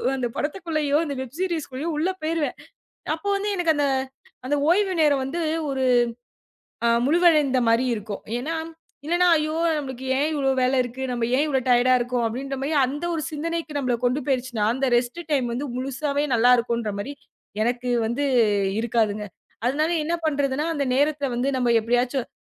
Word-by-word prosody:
அந்தப் 245 -3 -3
படத்துக்குள்ளயோ 305 -3 -1
அந்த 285 -2 -4
வெப் 260 +1 -7
சீரிஸ்லயோ 320 -5 -3
உள்ள 330 +5 +1
போயிருவேன். 315 -1 -1 0.6
அப்போ 365 +5 -5
வந்து 410 +1 -2
எனக்கு 335 -3 +2
அந்த 290 -1 +2 0.6
அந்த 290 +2 +1
ஓய்வு 385 +1 +3
நேரம் 290 -3 +3
வந்து 335 +6 -3 0.3
ஒரு 265 -1 -2 1.2
முழுதடைந்த 305 -5 +4
மாரி 230 +3 +3
இருக்கும். 210 -2 -6 0.2
ஏன்னா, 300 +7 -3 0.5
இல்லனா 350 +3 +2
ஐயோ. 310 +1 -1 0.2
நமக்கு 265 -2 -6
ஏன் 295 +2 +2
இவ்ளோ 275 -2 +1
வேலை 255 +1 +2
இருக்கு? 250 +2 -7
நாம 240 -2 -1
ஏன் 290 - +3
இவ்ளோ 270 -3 +1
டையர்டா 245 +1 +5
இருக்கோம் 245 -1 -1
அப்படின்னு 270 +4 -3 0.2
அந்த 290 +5 -5
ஒரு 315 - -2
சிந்தனைக்கு 320 0 -4
நம்மள 255 -3 0
கொண்டு 250 +4 +1
போயிடுச்சுன்னா 255 -5 -1
அந்த 265 +1 0
ரெஸ்ட் 245 +7 -1
டைம் 265 -4 +2
வந்து 265 +5 -3
முழுசாவே 280 +3 -1
நல்லா 235 +2 +5
இருக்கும்ன்ற 235 -3 -1
மாரி 275 +8 -5 0.5
எனக்கு 245 +1 -1 0.2
வந்து 255 +6 -1 0.6
இருக்காதுங்க. 215 -3 0 0.4
அதனால 305 +6 +1
என்ன 335 +3 -1
பண்றதுன்னு 285 -1 0
அந்த 285 -2 0
நேரத்துல 285 +1 +1
வந்து 255 +3 0
நம்ம 245 -1 +1
எப்படியாச்சும் 245 +2 0
275 Hz, 155 wpm, -24 LUFS, 245-305 Hz, 1.2 s, டையர்டா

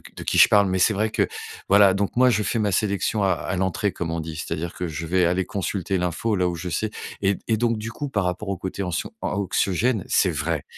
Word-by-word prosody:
de - - -7
qui - - 0
je - - +9
parle. 100 -1 +4
Mais 95 0 0
c'est 105 - +4
vrai 105 +2 0
que - - +1 0.4
voilà, 100 -1 +6
donc 100 +1 -2
moi, 125 +1 +5
je 105 -3 +1
fais 115 +4 -1
ma 105 -2 +1
sélection 100 +2 0
à 95 - +3
à 95 - -3
l'entrée, 95 +2 0
comme 85 -2 -4
on 85 0 -2
dit. 80 0 -7
C'est-à-dire 85 +2 -4
que 90 - -4
je 80 +1 -5
vais 90 +2 +2
aller 90 +2 +1
consulter 95 0 -2
l'info 90 +5 -1
là 90 -1 +2
où 90 - -2
je 90 +2 -5
sais. 105 +5 -2 0.3
Et 100 0 +2
et 110 - +2
donc, 115 0 +1
du 110 +2 -5
coup, 145 +5 -5
par 100 -6 0
rapport 90 +3 -3
au 100 - -2
côté 95 +2 -4
anxion 90 -4 -3
anxiogène, 100 +3 0
c'est 95 - +3
vrai, 75 0 -2
95 Hz, 250 wpm, -23 LUFS, 90-105 Hz, 0.4 s, je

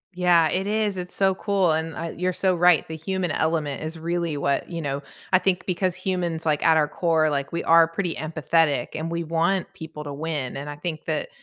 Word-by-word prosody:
Yeah, 175 -3 +4
it 190 +2 -1
is. 210 -2 0
It's 180 0 -5
so 190 -1 +2
cool, 195 -4 +1
and 160 +1 -1
I 165 - -4
you're 180 +1 -1
so 185 +1 +1
right. 175 -2 +4
The 160 - -7
human 180 +1 -2
element 155 -4 -1
is 155 +1 -5
really 170 -1 -2
what 140 -1 -1
you 170 -1 -4
know, 140 -2 -3 0.3
I 185 - +6
think 185 -1 0
because 180 0 0
humans, 180 -3 -2
like, 150 -2 +1
at 165 -1 +6
our 155 -1 +3
core, 160 -2 +2
like, 140 0 -2
we 170 - -2
are 165 0 +6
pretty 170 +1 -3
empathetic, 155 -3 +1
and 160 +1 -3
we 170 0 -2
want 170 +4 0
people 160 -5 -8
to 145 -1 -6
win, 145 -3 -3
and 145 +2 -6
I 145 - -6
think 155 +1 -5
that - - -2
165 Hz, 220 wpm, -24 LUFS, 155-180 Hz, 0.3 s, I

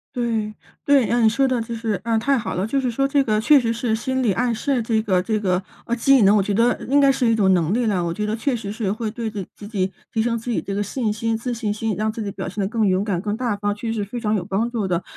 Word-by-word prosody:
对 225 -3 -1 0.3
对， 275 -5 +4
嗯， 240 -1 +3
你 - - +7
说 265 +4 +2
的 255 -2 0
就 230 +1 -5
是 225 -4 -2
嗯， 225 -1 +1
太 275 +4 +2
好 210 -5 -3
了。 185 +3 -1
就 275 +5 0
是 255 -2 -1
说 275 +4 +1
这 275 0 +2
个 215 -2 +1
确 280 +5 +6
实 230 -2 0
是 230 -1 -1
心 260 +3 -2
理 225 -5 +2
暗 240 +2 0
示 255 +3 0
这 220 -1 +1
个 190 -4 +1
这 215 +2 0
个 185 -2 0 0.3
呃， 235 - 0
技 265 +1 +4
能， 205 +2 +5
我 200 - +2
觉 205 - -1
得 235 +4 +3
应 285 +2 +4
该 275 -1 +5
是 260 - 0
一 230 - +4
种 200 -4 +3
能 175 +2 +1
力 240 -1 +1
了， 185 -4 +1
我 170 - -2
觉 210 - -3
得 210 +1 -1
确 250 +3 -1
实 205 -3 -5
是 215 -3 -2
会 220 +1 -3
对 230 +1 -5
的 200 -2 -4
自 205 - -10
己 195 -3 -1 0.2
提 220 - +1
升 230 0 0
自 235 +2 -5
己 - - 0
这 195 - -5
个 205 - 0
信 220 +1 -2
心 225 +1 -1
自 240 +3 -3
信 220 -3 -2
心， 215 -2 -2
让 215 0 0
自 225 0 -6
己 200 -1 -3
表 - - -6
现 200 +3 -4
得 190 - 0
更 220 0 0
勇 190 0 +2
敢 195 -5 -1
更 210 0 -2
大 235 -3 -1
方， 205 0 -1
确 220 +3 -7
实 220 -2 -2
是 - - -5
非 240 +4 -6
常 215 -1 0
有 175 -3 -2
帮 210 +4 -1
助 220 -5 -2
的。 175 0 -1
220 Hz, 335 characters per minute, -22 LUFS, 205-240 Hz, 0.3 s, 你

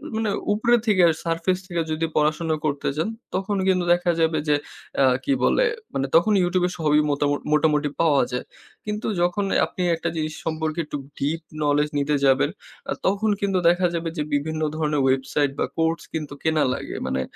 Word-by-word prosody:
মানে 220 -1 0 0.2
উপরে 235 +3 +3
থেকে 190 -4 +4 0.2
surface 170 +2 0
থেকে 170 -2 -1
যদি 155 +1 0
পড়াশোনা 155 +1 +1
করতে 140 -1 -1
চান 165 +8 0 0.3
তখন 195 +2 -1
কিন্তু 185 -2 +3
দেখা 175 0 +1
যাবে 160 -1 +2
যে 150 - +4 0.4
অ্যাঁ 130 -2 +4
কি 280 - +1
বলে - - +3 0.5
তখন 190 +6 +5
YouTube 180 0 +1
এ - - -3
সবই 150 -1 +3
মোটামু 145 0 +1 0.2
মোটামুটি 150 -1 +2
পাওয়া 150 -5 +4
যায়। 125 - -3 0.4
কিন্তু 210 +1 -3
যখন 175 +3 +1 0.2
আপনি 185 - -7
একটা 160 - -3
জিনিস 155 -1 -2
সম্পর্কে 160 0 -2
একটু 150 - -5 0.2
deep 155 +4 -1 0.2
knowledge 150 0 +1
নিতে 145 +1 +1
যাবেন 135 -1 +4 0.4
অ্যা - - -2
তখন 200 +3 +1
কিন্তু 195 -2 +1
দেখা 180 +1 +3
যাবে 165 0 -2
যে 150 - 0
বিভিন্ন 155 +2 -1
ধরনের 150 -2 0
website 135 +2 +1
বা - - +2
course 165 0 0
কিন্তু 155 -3 -4
কেনা 160 -1 +2
লাগে। - - -6
মানে 65 0 -1
160 Hz, 175 wpm, -23 LUFS, 150-180 Hz, 0.5 s, তখন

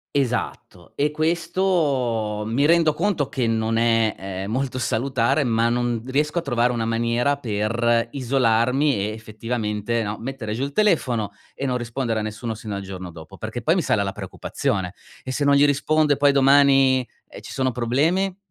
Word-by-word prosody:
Esatto, 120 -9 -3
e 145 +1 +2
questo 150 - 0
mi 120 +6 +1
rendo 165 -1 +4
conto 170 -4 -1
che 130 -4 -1
non 115 0 0
è, 115 -1 +2
ehm, 95 +1 -5
molto 130 +1 -2
salutare, 130 +3 0
ma 115 -1 +2
non 120 -1 -1
riesco 150 +5 -1
a - - -4
trovare 125 -4 +1
una 115 -2 -2
maniera 115 +4 0
per 115 0 0
isolarmi 130 +1 +2
e, 105 +1 -2
effettivamente, 110 0 -3
no, 105 +1 -4
mettere 120 -4 -5
giù 125 - -2
il 140 0 -4
telefono 130 - +1 0.2
e 140 - -4
non 125 -1 0
rispondere 120 -1 -2
a - - -2
nessuno 110 +1 -4
sino 105 -2 -6
al 100 - -4
giorno 95 -2 -7
dopo, 80 +3 -12
perché 115 +2 -5
poi 160 +6 +2
mi 185 - +1
sale 105 -8 +1
la 95 - -2
preoccupazione: 95 -1 -3 0.3
e 130 - -5
se 145 +2 -1
non 140 0 +5
gli 140 - +5
rispondo 150 +1 +2
e 145 - +3
poi 145 -1 +4
domani, 135 -2 +4 0.2
ehm, - - -10
ci - - -9
sono 130 -1 0
problemi? 155 +11 0
120 Hz, 180 wpm, -22 LUFS, 110-140 Hz, 0.3 s, non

